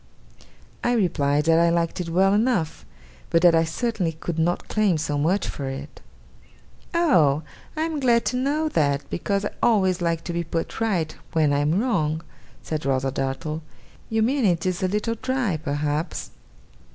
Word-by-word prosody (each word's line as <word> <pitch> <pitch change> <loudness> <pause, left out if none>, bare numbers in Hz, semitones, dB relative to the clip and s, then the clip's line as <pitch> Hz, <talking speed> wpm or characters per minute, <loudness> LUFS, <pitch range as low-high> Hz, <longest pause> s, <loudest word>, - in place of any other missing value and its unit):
I 240 - +2
replied 150 -9 +1
that 165 0 +4
I 170 0 +4
liked 170 +1 0
it 170 - -5
well 190 +3 +3
enough, 205 -8 0 0.4
but 165 0 +2
that 175 -1 +7
I 165 0 +4
certainly 180 0 -1
could 165 +1 -4
not 175 +2 0
claim 210 -6 +2
so 150 -1 -2
much 165 +8 +1
for 140 - -5
it. 135 +1 -8 0.9
'Oh! 165 - +3 0.3
I 310 - +1
am 320 -2 -2
glad 240 -3 +3
to - - 0
know 285 +5 0
that, 140 - 0
because 200 +3 -1
I - - -2
always 190 -5 +3
like 165 -1 0
to 170 - -4
be 170 0 -1
put 165 0 -4
right 180 -9 0 0.2
when 155 -3 +3
I 140 - +2
am 150 +6 +2
wrong,' 165 -10 0 0.4
said 155 -1 -3
Rosa 135 -1 0
Dartle. 135 +4 -3 0.5
'You 220 0 +1
mean 265 +3 +1
it 175 -5 +2
is 185 +1 -1
a 185 - +2
little 210 +4 -1
dry, 255 -10 0
perhaps? 150 +1 -2
170 Hz, 175 wpm, -24 LUFS, 155-215 Hz, 0.9 s, that